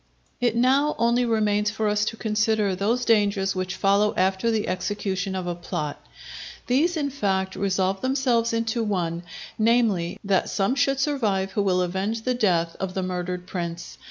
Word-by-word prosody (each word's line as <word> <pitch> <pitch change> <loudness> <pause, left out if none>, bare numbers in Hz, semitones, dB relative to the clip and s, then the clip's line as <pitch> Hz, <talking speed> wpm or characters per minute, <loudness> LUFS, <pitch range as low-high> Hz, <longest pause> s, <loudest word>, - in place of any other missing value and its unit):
It 240 -2 +1
now 270 +5 +3
only 235 +1 +2
remains 210 -2 +1
for 220 0 -2
us 210 0 +1
to 225 - -3
consider 215 -2 +1
those 225 +7 0
dangers 205 -3 +2
which 185 0 -3
follow 200 +2 +2
after 190 +4 +1
the 220 -2 0
execution 190 0 -2
of 185 -1 -3
a 175 - -2
plot. 170 -4 -5 0.6
These 320 +8 +2
in 285 -2 -1
fact 190 -7 -1
resolve 190 0 0
themselves 260 -3 +1
into 230 0 -1
one, 175 -5 -1 0.4
namely, 215 -6 +2
that 195 -2 +1
some 200 +4 +1
should 275 0 +1
survive 215 -10 0
who 205 - 0
will 185 -2 +2
avenge 195 +5 -2
the 255 - +1
death 175 -8 +1
of 190 -1 -4
the 190 - -1
murdered 180 0 -3
prince. 175 -2 -6
205 Hz, 165 wpm, -24 LUFS, 185-230 Hz, 0.6 s, now